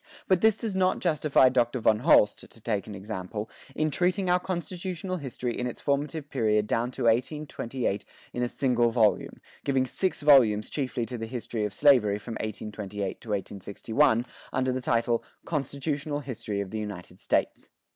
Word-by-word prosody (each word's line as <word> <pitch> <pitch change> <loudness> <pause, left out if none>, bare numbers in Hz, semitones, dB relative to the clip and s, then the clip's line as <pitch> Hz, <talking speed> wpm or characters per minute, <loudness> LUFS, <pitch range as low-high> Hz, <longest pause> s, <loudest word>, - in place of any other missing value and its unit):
But 185 -2 +3
this 220 -1 +4
does 220 -4 -3
not 185 -1 +2
justify 150 -6 +3
Dr. 125 0 +1
von 110 -1 +3
Holst 120 -6 +5
(to - - -14
take 105 -2 -2
an 105 - -7
example) 105 +1 -5 0.2
in 155 0 +1
treating 180 +4 +1
our 180 - +4
constitutional 185 0 -4
history 125 -5 -4
in 125 - -2
its 120 - -6
formative 145 +1 -1
period 105 -4 +2
down 115 +3 0
to - - -4
1828 120 -3 0 0.3
in 125 - -2
a 125 - +2
single 120 -2 +2
volume, 115 -2 +1 0.2
giving 135 -2 +2
six 185 +4 -2
volumes 115 -8 +5
chiefly 130 -4 -2
to 120 0 -6
the 115 - -4
history 115 -2 -3
of 105 - -4
slavery 110 -8 +5
from 115 +3 -7
1828 105 -2 -5
to 115 - -12
1861, 105 +5 0 0.3
under 130 0 0
the 130 0 -2
title 115 -1 +1 0.2
"Constitutional 145 0 -2
History 110 -6 -4
of 100 - -6
the 110 - -3
United 95 -3 -7
States." - - 0
125 Hz, 165 wpm, -27 LUFS, 110-145 Hz, 0.3 s, Holst